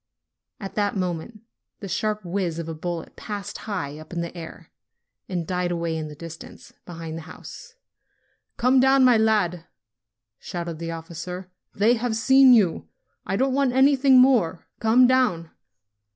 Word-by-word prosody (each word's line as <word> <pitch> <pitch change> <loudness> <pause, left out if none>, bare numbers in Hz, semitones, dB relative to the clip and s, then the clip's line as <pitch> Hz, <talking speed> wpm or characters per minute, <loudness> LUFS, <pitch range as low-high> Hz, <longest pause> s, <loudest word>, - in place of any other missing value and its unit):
At 195 -3 -7
that 205 -1 -1
moment 185 +4 -4 0.4
the 200 - -7
sharp 215 +1 -2
whiz 175 -2 -2
of 165 -1 -5
a 165 - -4
bullet 170 +1 -6
passed 205 -1 -6
high 155 -7 -4
up 155 - -13
in 175 -1 -3
the 170 +1 -6
air, 165 -2 -10 0.6
and 175 -3 -3
died 180 +1 -1
away 170 -1 -2
in 155 -1 -4
the 150 - -10
distance, 165 +1 -11
be 175 - -8
hind 165 -1 -6
the 160 - -12
house. 475 -2 -12 0.8
"Come 255 +2 +3
down, 265 0 +5
my 245 -2 +6
lad!" 200 -6 +1 0.7
shouted 170 -2 -6
the 165 0 -5
officer. 170 +3 -7 0.2
"They 215 +4 +4
have 230 -1 -2
seen 265 +3 +6
you. 200 -9 +3 0.4
I - - -1
don't 265 +4 +1
want 275 -2 +1
anything 270 0 +5
more. 230 -10 +3
Come 230 +3 +5
down!" 245 -11 +1
185 Hz, 160 wpm, -24 LUFS, 165-245 Hz, 0.8 s, my